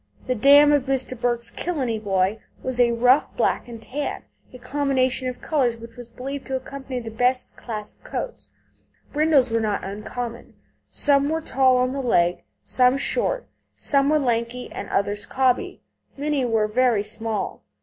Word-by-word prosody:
The 255 Hz, -, 0 dB
dam 285 Hz, +5 st, +7 dB
of 290 Hz, -3 st, +3 dB
Mr. 260 Hz, -1 st, 0 dB
Burke's 240 Hz, -1 st, -1 dB
Killeney 260 Hz, -10 st, -2 dB
Boy 195 Hz, 0 st, 0 dB, 0.2 s
was 255 Hz, -1 st, -2 dB
a 240 Hz, -1 st, +5 dB
rough 250 Hz, +4 st, +3 dB
black -, -, +1 dB
and 235 Hz, -1 st, -8 dB
tan, 280 Hz, +6 st, -4 dB, 0.3 s
a 250 Hz, -, -10 dB
combination 260 Hz, -1 st, 0 dB
of 255 Hz, -, -5 dB
colours 255 Hz, -7 st, +1 dB
which 230 Hz, 0 st, -12 dB
was 245 Hz, -1 st, -10 dB
believed 270 Hz, +3 st, -6 dB
to 265 Hz, -, -2 dB
accompany 265 Hz, -1 st, -5 dB
the 230 Hz, -2 st, -7 dB
best 250 Hz, +3 st, 0 dB
class 215 Hz, -3 st, -6 dB
of -, -, -36 dB
coats. -, -, -6 dB, 0.6 s
Brindles 295 Hz, -5 st, +3 dB
were 230 Hz, -, +2 dB
not 215 Hz, -2 st, -1 dB
uncommon. 225 Hz, +4 st, -6 dB, 0.3 s
Some 285 Hz, -1 st, +2 dB
were 320 Hz, +1 st, 0 dB
tall 260 Hz, -4 st, +3 dB
on 255 Hz, +1 st, +1 dB
the 275 Hz, -, -2 dB
leg, 175 Hz, -8 st, +2 dB, 0.2 s
some 250 Hz, +1 st, +3 dB
short; -, -, -1 dB, 0.3 s
some 280 Hz, -1 st, +2 dB
were 305 Hz, -, +4 dB
lanky 245 Hz, -2 st, -1 dB
and -, -, -6 dB
others 205 Hz, +1 st, -1 dB
cobby; 260 Hz, -1 st, 0 dB, 0.3 s
many 285 Hz, -2 st, 0 dB
were 225 Hz, -3 st, +2 dB
very 230 Hz, -1 st, +2 dB
small. 215 Hz, 0 st, -4 dB
250 Hz, 165 wpm, -23 LUFS, 230-275 Hz, 0.6 s, dam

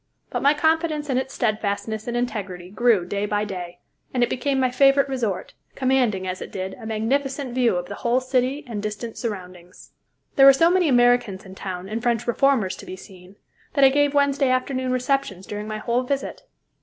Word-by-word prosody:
But -, -, -2 dB
my 285 Hz, +2 st, +4 dB
confidence 315 Hz, -1 st, +1 dB
in 255 Hz, -, +2 dB
its 265 Hz, 0 st, -5 dB
steadfastness 215 Hz, -1 st, -2 dB
and 240 Hz, 0 st, -2 dB
integrity 195 Hz, -7 st, -4 dB
grew 220 Hz, -4 st, +2 dB
day 200 Hz, +3 st, -2 dB
by 210 Hz, 0 st, 0 dB
day, 180 Hz, -3 st, -6 dB, 0.3 s
and 250 Hz, -2 st, +1 dB
it -, -, 0 dB
became 270 Hz, +1 st, 0 dB
my 255 Hz, -1 st, +2 dB
favorite 275 Hz, +2 st, +4 dB
resort, 240 Hz, -8 st, -3 dB, 0.2 s
commanding, 255 Hz, -8 st, +1 dB
as 185 Hz, 0 st, -4 dB
it -, -, -7 dB
did, 190 Hz, 0 st, -4 dB
a 220 Hz, -, -7 dB
magnificent 265 Hz, +4 st, -1 dB
view 240 Hz, -5 st, +2 dB
of 175 Hz, 0 st, -2 dB
the 200 Hz, -, -7 dB
whole 240 Hz, +4 st, +1 dB
city 255 Hz, +2 st, 0 dB
and 215 Hz, -4 st, -4 dB
distant 215 Hz, +2 st, -5 dB
surroundings. 185 Hz, -5 st, -7 dB, 0.5 s
There 270 Hz, 0 st, +8 dB
were 275 Hz, -, +10 dB
so 330 Hz, +5 st, +4 dB
many 365 Hz, -2 st, +3 dB
Americans 245 Hz, -6 st, +3 dB
in 190 Hz, -, -11 dB
town, 185 Hz, -1 st, -6 dB
and 220 Hz, +3 st, -4 dB
French 235 Hz, -1 st, 0 dB
reformers 240 Hz, -5 st, +2 dB
to -, -, -11 dB
be 185 Hz, -, -6 dB
seen, 185 Hz, 0 st, -15 dB, 0.4 s
that 280 Hz, -, +4 dB
I -, -, +8 dB
gave 290 Hz, +1 st, +2 dB
Wednesday 280 Hz, -1 st, +2 dB
afternoon 255 Hz, 0 st, 0 dB
receptions 255 Hz, -7 st, -1 dB
during 210 Hz, 0 st, -6 dB
my 215 Hz, 0 st, -4 dB
whole 235 Hz, +3 st, 0 dB
visit. 275 Hz, +2 st, -4 dB
240 Hz, 195 wpm, -23 LUFS, 200-270 Hz, 0.5 s, were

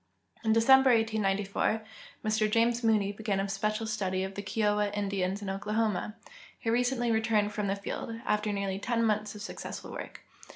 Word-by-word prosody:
In 220 Hz, -, +2 dB
December, 260 Hz, +3 st, +6 dB
1894, 215 Hz, -1 st, 0 dB, 0.4 s
IMr 215 Hz, 0 st, +2 dB
James 230 Hz, +2 st, +2 dB
Mooney 215 Hz, -3 st, +3 dB
began 205 Hz, -1 st, -2 dB
a 195 Hz, -, 0 dB
special 215 Hz, +3 st, -1 dB
study 190 Hz, -4 st, -1 dB
of 190 Hz, 0 st, -4 dB
tlie 200 Hz, 0 st, -6 dB
Kiowa 210 Hz, -2 st, +2 dB
Indians 200 Hz, -1 st, -2 dB
in 195 Hz, -, -4 dB
Oklahoma. 210 Hz, +1 st, -1 dB, 0.4 s
He 225 Hz, -, -2 dB
recently 245 Hz, 0 st, +1 dB
returned 220 Hz, -2 st, +2 dB
from 210 Hz, -1 st, -1 dB
the 195 Hz, -, 0 dB
field, 200 Hz, +3 st, -5 dB
after 210 Hz, 0 st, +1 dB
nearly 200 Hz, -1 st, -2 dB
ten 230 Hz, +2 st, 0 dB
months 215 Hz, -1 st, 0 dB
of 210 Hz, -, -7 dB
successful -, -, -7 dB
Avork. -, -, -7 dB
210 Hz, 165 wpm, -30 LUFS, 200-225 Hz, 0.4 s, December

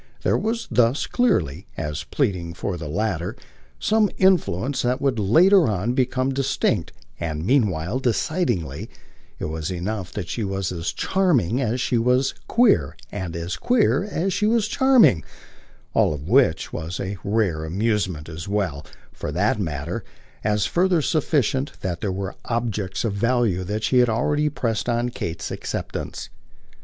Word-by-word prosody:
There -, -, +3 dB
was 230 Hz, +2 st, -1 dB
thus 120 Hz, +4 st, +3 dB
clearly, 90 Hz, -, 0 dB
as 75 Hz, -1 st, -3 dB
pleading 90 Hz, -, -1 dB
for 95 Hz, +1 st, -3 dB
the 80 Hz, -3 st, -6 dB
latter, 95 Hz, +2 st, -2 dB, 0.4 s
some 215 Hz, -1 st, +3 dB
influence 145 Hz, -, +2 dB
that 125 Hz, +1 st, 0 dB
would 135 Hz, -5 st, 0 dB
later 170 Hz, -, +5 dB
on 105 Hz, +3 st, 0 dB
become 130 Hz, +1 st, +1 dB
distinct; 130 Hz, -, 0 dB, 0.3 s
and 80 Hz, -1 st, -3 dB
meanwhile, 105 Hz, -, +1 dB
decidedly, 115 Hz, -, -1 dB, 0.5 s
it -, -, -4 dB
was 80 Hz, 0 st, -3 dB
enough 95 Hz, +1 st, -3 dB
that 90 Hz, -5 st, -4 dB
she 115 Hz, -, -3 dB
was 95 Hz, -2 st, -2 dB
as 85 Hz, -2 st, -2 dB
charming 140 Hz, -, +1 dB
as 120 Hz, 0 st, 0 dB
she 125 Hz, -2 st, +1 dB
was 125 Hz, +3 st, +2 dB
queer 85 Hz, -, +3 dB
and 90 Hz, -5 st, -4 dB
as 85 Hz, +2 st, -3 dB
queer 245 Hz, -5 st, +2 dB
as 195 Hz, -2 st, -1 dB
she 210 Hz, 0 st, +1 dB
was 225 Hz, -1 st, +2 dB
charming 245 Hz, -, +5 dB, 0.7 s
all 75 Hz, -, +3 dB
of 75 Hz, +1 st, -8 dB
which 115 Hz, -7 st, +3 dB
was 80 Hz, +3 st, -4 dB
a 100 Hz, +1 st, -3 dB
rare 100 Hz, -7 st, 0 dB
amusement; 95 Hz, -2 st, -1 dB
as 80 Hz, +1 st, -7 dB
well, 95 Hz, -8 st, -1 dB, 0.3 s
for -, -, -5 dB
that 100 Hz, -, +1 dB
matter, 75 Hz, -6 st, -3 dB, 0.4 s
as 105 Hz, -1 st, +1 dB
further 175 Hz, -2 st, +2 dB
sufficient 140 Hz, -3 st, +1 dB
that 90 Hz, -3 st, -3 dB
there 100 Hz, -, -1 dB
were 95 Hz, +1 st, -4 dB
objects 110 Hz, -5 st, -2 dB
of 110 Hz, -, 0 dB
value 115 Hz, -3 st, +1 dB, 0.2 s
she 125 Hz, +3 st, +2 dB
had 125 Hz, -1 st, +4 dB
already 150 Hz, +7 st, +1 dB
pressed 115 Hz, -5 st, -2 dB
on 120 Hz, +1 st, +1 dB
Kate's 85 Hz, -8 st, -5 dB
acceptance. -, -, -5 dB
110 Hz, 150 wpm, -23 LUFS, 90-135 Hz, 0.7 s, later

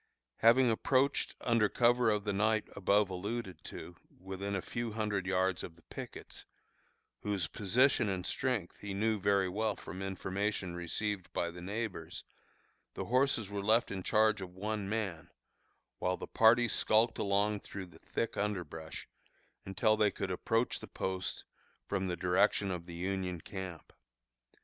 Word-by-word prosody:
Having 120 Hz, +2 st, +6 dB
approached, 130 Hz, +4 st, +2 dB
under 115 Hz, -3 st, +3 dB
cover 120 Hz, 0 st, +4 dB
of 105 Hz, -1 st, +1 dB
the 105 Hz, -1 st, -1 dB
night 110 Hz, +2 st, +2 dB
above 100 Hz, 0 st, +3 dB
alluded 100 Hz, +2 st, -4 dB
to, 90 Hz, -, -7 dB, 0.2 s
within 95 Hz, +2 st, -4 dB
a -, -, 0 dB
few 115 Hz, -2 st, -3 dB
hundred 105 Hz, -4 st, -1 dB
yards 95 Hz, -1 st, +1 dB
of 80 Hz, -, -7 dB
the 85 Hz, -, -22 dB
pickets, -, -, -8 dB, 0.8 s
whose 100 Hz, -4 st, -1 dB
position 115 Hz, -, +3 dB
and 95 Hz, -2 st, -2 dB
strength 120 Hz, -9 st, -1 dB
he 100 Hz, -1 st, -5 dB
knew 110 Hz, +1 st, +1 dB
very 100 Hz, -1 st, +3 dB
well 105 Hz, +3 st, 0 dB
from 95 Hz, -, -8 dB
information 95 Hz, 0 st, -2 dB
received 90 Hz, +3 st, -2 dB
by 85 Hz, -, -1 dB
the 90 Hz, +1 st, -10 dB
neighbors, 100 Hz, -3 st, -4 dB, 0.7 s
the -, -, -3 dB
horses 125 Hz, -5 st, +2 dB
were 100 Hz, -1 st, -2 dB
left 110 Hz, +4 st, +3 dB
in 95 Hz, -1 st, -3 dB
charge 110 Hz, +1 st, +3 dB
of 90 Hz, -1 st, -8 dB
one 105 Hz, 0 st, -3 dB
man, 100 Hz, -7 st, -3 dB, 0.7 s
while 90 Hz, 0 st, 0 dB
the -, -, -6 dB
party 120 Hz, +2 st, +5 dB
skulked 110 Hz, +1 st, +3 dB
along 100 Hz, +1 st, +2 dB
through 100 Hz, -1 st, -7 dB
the 90 Hz, -, -17 dB
thick 115 Hz, -, -3 dB
underbrush, 90 Hz, -6 st, -4 dB, 0.6 s
until 110 Hz, +3 st, +3 dB
they 105 Hz, -1 st, +4 dB
could -, -, -4 dB
approach 115 Hz, +2 st, 0 dB
the -, -, -9 dB
post 95 Hz, 0 st, -3 dB, 0.4 s
from 95 Hz, -2 st, -1 dB
the 90 Hz, -1 st, -2 dB
direction 95 Hz, +2 st, +2 dB
of 85 Hz, -1 st, -5 dB
the 85 Hz, -, -7 dB
Union 90 Hz, 0 st, -2 dB
camp. 95 Hz, -3 st, -7 dB
100 Hz, 155 wpm, -33 LUFS, 95-110 Hz, 0.8 s, Having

